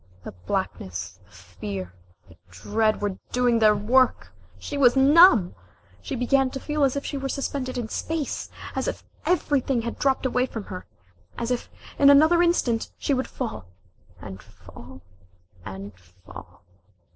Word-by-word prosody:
The - - -7
blackness, 90 0 -5
the - - -27
fear, 95 0 -7 0.3
the 85 - -18
dread, 215 - -1
were 200 -2 -2
doing 245 -2 +2
their 215 -1 +5
work! 245 +5 +2 0.3
She 290 - -7
was 260 -3 +4
numb! 270 - +6 0.5
She - - -5
began 260 +2 +2
to 270 - -6
feel 300 +1 -1
as 270 -1 +2
if 280 - -3
she 285 - -4
were 270 0 -4
suspended 265 -2 -3
in 240 -2 -3
space, 315 +5 -4 0.3
as - - -2
if - - -4 0.2
everything 275 -8 +1
had 235 - -5
dropped 270 -1 +1
away 250 0 +1
from 225 -4 -6
her, 185 -2 -9 0.5
as 235 +1 -3
if 245 - -2 0.3
in 280 - +7
another 315 +5 +6
instant 265 -10 +1
she 285 - -1
would 260 0 -1
fall 235 - -6 0.5
and 95 -1 -9
fall 85 +1 -15 0.6
and 95 +2 -8
fall 90 +1 -15
240 Hz, 155 wpm, -24 LUFS, -, 0.6 s, in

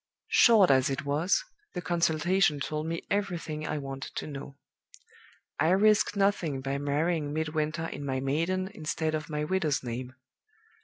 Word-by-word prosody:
"Short 215 -8 +6
as 130 0 +4
it 135 +1 -3
was, 155 - +1 0.3
the 180 - -2
consultation 170 0 +2
told 155 +3 -3
me 165 0 -3
everything 170 -6 -2
I 155 - -2
wanted 135 -1 -6
to - - -3
know. 140 -1 -8 1.0
I 160 +2 +3
risk 210 +3 +4
nothing 195 -8 +1
by 135 +1 -2
marrying 150 +2 0
Midwinter 155 +1 -1
in 145 - -6
my 135 -2 -1
maiden 165 +8 0
instead 160 -4 -3
of 155 -1 -3
my 150 -1 -2
widow's 155 -4 0
name. 125 +1 -5
155 Hz, 150 wpm, -29 LUFS, 140-175 Hz, 1.0 s, Short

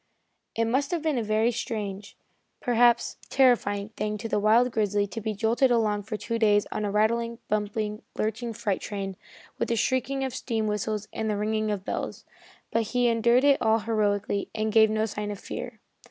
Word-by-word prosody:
It 230 - +1
must 265 +5 0
have 340 -3 -2
been 305 -6 +1
a - - -1
very 215 +2 +2
strange, 210 -4 -5 0.4
perhaps 240 -1 +3
terrifying, 220 -6 +3
thing 210 -1 -3
to 220 - -5
the 215 - 0
wild 225 +4 +4
grizzly 205 -2 +1
to 225 +3 -6
be 215 0 -3
jolted 230 +5 +2
along 215 -4 +2
for 215 +1 -5
two 230 +1 -3
days 205 -2 +4
on 215 - -2
a 205 - 0
rattling, 230 +3 +1
bumping, 210 0 -2 0.2
lurching 225 +2 -2
freight 205 -3 -2
train, 195 -2 -4 0.4
with - - -1
the 235 - +2
shrieking 260 +4 0
of 265 -2 -3
steam 225 -4 -2
whistles 210 0 -2
and 220 0 -2
the 210 - 0
ringing 215 +1 0
of 200 -2 -3
bells, - - -4 0.5
but 230 - +2 0.2
he 245 -1 +4
endured 235 +2 +3
it 285 -1 +4
all 220 0 +4
heroically 205 -2 0
and 215 0 0
gave 220 -1 +6
no 215 0 +1
sign 210 -1 -4
of 205 - -4
fear. 240 -3 -7
220 Hz, 190 wpm, -27 LUFS, 210-235 Hz, 0.5 s, gave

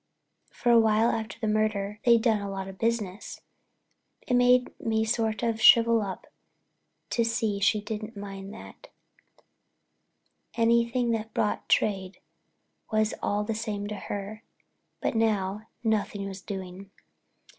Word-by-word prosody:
For 240 - 0
a 235 - +7
while 220 +1 +3
after 225 0 -4
the 220 - -2
murder 210 -1 0
they'd 235 -2 +5
done 220 -4 +2
a 200 - -4
lot 195 -1 -5
of 190 0 -10
business—it 225 +2 -6
made 250 0 +4
me 220 -1 0
sort 225 0 -1
of 225 -1 -1
shrivel 230 0 +7
up 195 -3 -5 0.9
to 235 - +2
see 225 -3 -1
she 205 +2 +2
didn't 215 +1 -6
mind 195 -1 -7
that; 215 - -12 1.7
anything 235 +1 +2
that 225 -1 -3
brought 210 - -1
trade 195 -2 +1 0.7
was 215 0 +1
all 205 +1 0
the 225 +2 -2
same 215 -2 -3
to 210 - -4
her—but 205 +2 -7
now, 215 -2 0 0.2
nothing 210 -2 -1
was 195 -1 -7
doing. 190 -1 -7
215 Hz, 130 wpm, -27 LUFS, 200-230 Hz, 1.7 s, a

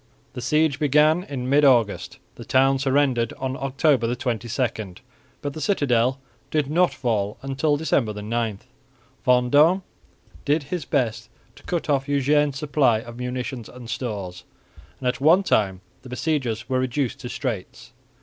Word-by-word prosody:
The 125 - -6
siege 150 +2 +1
began 150 +3 +4
in 130 -6 -5
mid 145 +3 +4
August; 120 -7 +2 0.2
the - - -10
town 135 +1 +3
surrendered 135 -4 +1
on 130 0 -4
October 135 -3 +1
22, 115 -4 -3 0.5
but 145 -1 -3
the 155 - -7
citadel 130 - +1 0.3
did 150 -2 0
not 175 +3 +3
fall 105 -5 -1
until 135 +2 0
December 140 -7 +1
9. 110 -1 -2 0.7
Vendôme 145 +9 +4 0.6
did 150 +1 +1
his 155 +2 -4
best 115 -4 -1 0.3
to - - -16
cut 175 -2 -3
off 140 -2 0
Eugene's 145 0 +2
supplies 135 -6 +1
of 120 +1 -10
munitions 125 -1 -4
and 125 -1 -9
stores, 100 -9 -5 0.6
and 130 - -3
at 125 +1 -1
one 170 +7 +5
time 95 - +1 0.2
the 130 - -12
besiegers 125 -5 -2
were 130 -1 0
reduced 130 0 -1
to 120 - -7
straits. 120 -2 -5
130 Hz, 145 wpm, -23 LUFS, 120-145 Hz, 0.7 s, one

